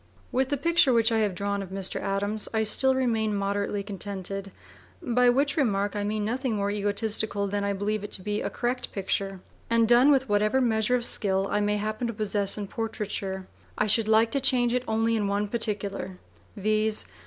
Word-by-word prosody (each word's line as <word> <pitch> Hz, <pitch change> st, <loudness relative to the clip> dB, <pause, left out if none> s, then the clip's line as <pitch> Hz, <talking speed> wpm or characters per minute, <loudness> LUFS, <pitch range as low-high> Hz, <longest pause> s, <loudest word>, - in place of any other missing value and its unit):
With 260 Hz, +1 st, +1 dB
the 285 Hz, -, 0 dB
picture 335 Hz, -1 st, +3 dB
which 230 Hz, 0 st, +3 dB
I 225 Hz, -, +2 dB
have 205 Hz, -4 st, 0 dB
drawn 200 Hz, +2 st, -2 dB
of 195 Hz, -, -7 dB
Mr. 190 Hz, 0 st, -1 dB
Adams, 205 Hz, +2 st, -2 dB
I 220 Hz, -, +2 dB
still 265 Hz, +5 st, +4 dB
remain 225 Hz, -5 st, 0 dB
moderately 200 Hz, 0 st, -1 dB
contented 195 Hz, -1 st, -4 dB, 0.5 s
by 245 Hz, +1 st, +3 dB
which 280 Hz, +3 st, +2 dB
remark 205 Hz, -8 st, 0 dB
I 205 Hz, -, -1 dB
mean 210 Hz, 0 st, -1 dB
nothing 250 Hz, +1 st, -1 dB
more 200 Hz, 0 st, -1 dB
egotistical 205 Hz, 0 st, 0 dB
than 200 Hz, +1 st, -2 dB
that 200 Hz, -, -1 dB
I -, -, 0 dB
believe 205 Hz, +1 st, -2 dB
it 205 Hz, -, -6 dB
to 185 Hz, -, -3 dB
be 210 Hz, +1 st, -2 dB
a -, -, -2 dB
correct 250 Hz, +1 st, -3 dB
picture, 195 Hz, -1 st, -2 dB, 0.3 s
and 230 Hz, -1 st, +3 dB
done 245 Hz, +4 st, +6 dB
with 270 Hz, -2 st, +3 dB
whatever 210 Hz, +4 st, +2 dB
measure 230 Hz, -1 st, +2 dB
of 240 Hz, -1 st, -1 dB
skill 195 Hz, -4 st, 0 dB
I 205 Hz, -, +1 dB
may 210 Hz, 0 st, +1 dB
happen 215 Hz, +3 st, -2 dB
to 230 Hz, -, -3 dB
possess 205 Hz, -2 st, -1 dB
in 205 Hz, -, -3 dB
portraiture. 205 Hz, -4 st, -4 dB, 0.3 s
I 215 Hz, -, +2 dB
should 215 Hz, +1 st, +3 dB
like 220 Hz, +1 st, +4 dB
to 275 Hz, -, 0 dB
change 245 Hz, -3 st, +2 dB
it 250 Hz, 0 st, 0 dB
only 225 Hz, +1 st, +1 dB
in 210 Hz, -2 st, 0 dB
one 200 Hz, +1 st, 0 dB
particular, 200 Hz, -4 st, -3 dB, 0.4 s
viz. 215 Hz, +1 st, 0 dB
215 Hz, 200 wpm, -27 LUFS, 200-235 Hz, 0.5 s, done